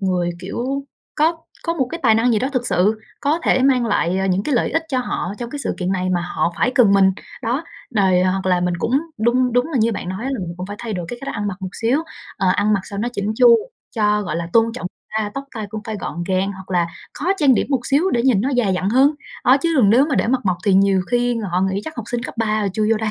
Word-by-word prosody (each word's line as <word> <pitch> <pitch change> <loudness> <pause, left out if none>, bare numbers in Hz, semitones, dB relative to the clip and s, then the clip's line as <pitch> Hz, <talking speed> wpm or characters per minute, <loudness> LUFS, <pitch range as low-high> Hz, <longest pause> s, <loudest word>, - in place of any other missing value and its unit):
người, 180 -3 0
kiểu, 255 +9 -3 0.3
có 325 +2 +2 0.3
có 335 0 0
một 265 -6 0
cái 335 - -5
tài 225 -4 +5
năng 235 +2 +3
gì 220 - +3
đó 260 +5 -1
thực 250 -2 -1
sự 210 +4 +2 0.2
có 295 +3 +1
thể 260 - +3
mang 255 -3 +3
lại, 190 -3 +1
à, 190 - 0
những 190 +1 +1
cái 285 - -1
lợi 235 - +1
ích 325 - +1
cho 260 -4 0
họ 200 -6 -3
trong 235 -1 -5
cái 290 - -5
sự - - -1
kiện 185 0 -1
này 185 -1 -1
mà 175 - +1
họ 170 -1 -1
phải 250 - +1
cần 230 -7 +5
mình. 195 -1 +5 0.3
Đó, 255 +7 -1 0.3
đòi 190 -6 +3
hoặc 185 +1 0
là 180 -1 +2
mình 180 0 0
cũng 245 +10 +1 0.2
đun 245 +2 +2
đúng 245 +1 +2
là 270 - +1
như 230 +1 +2
bạn 190 - -5
nói 190 +6 -4
là 270 -1 -2
mình 170 -2 -5
cũng 180 - -5
phải 205 +1 -7
thay 230 -2 -4
đổi 175 -3 -4
cái 245 - -6
cách - - -4
ăn 205 - -2
mặc 185 - -4
một 185 - -5
xíu, 240 +6 +2 0.4
ờ, 190 - +1
ăn 205 +2 +2
mặc 195 - +1
sao 200 - -7
nó 235 - -1
chỉn 205 -1 -2
chu 240 -2 +7 0.4
cho, 210 -1 +2
gọi 165 -4 -3
là, 170 0 -3
tôn 230 0 +4
trọng 225 -7 -5 0.3
ta, 210 -1 -2
tóc 275 - -4
tai 215 -2 -4
cũng 215 0 -5
phải 220 -2 -4
gọn 170 0 -4
gàng 190 +1 0
hoặc 190 -1 -12
là 175 -2 +2 0.3
khó 300 - -5
trang 280 -6 +4
điểm - - 0
một 270 -3 +2
xíu 310 +7 +2
để 235 - +1
nhìn 245 -6 +3
nó 255 - 0
già 245 -6 +1
dặn 185 0 0
hơn. 270 +5 +4 0.3
Đó 255 +2 +6
chứ 330 +3 0
đừng 215 -7 +5
nếu 255 +6 +5
mà 285 - -1
để - - +1
mặt 250 +2 +1
mộc 185 -3 +1
thì 200 -3 +3
nhiều 195 0 +4
khi 245 0 +1 0.2
họ 180 - +2
nghĩ 190 +1 0
chắc 315 - -7
học 235 - -4
sinh 240 -1 -2
cấp 260 - -6
3 215 -1 +1
rồi 200 - 0
chui 215 +2 0
vô - - +2
đây. 215 0 -2
220 Hz, 290 wpm, -20 LUFS, 190-250 Hz, 0.4 s, chu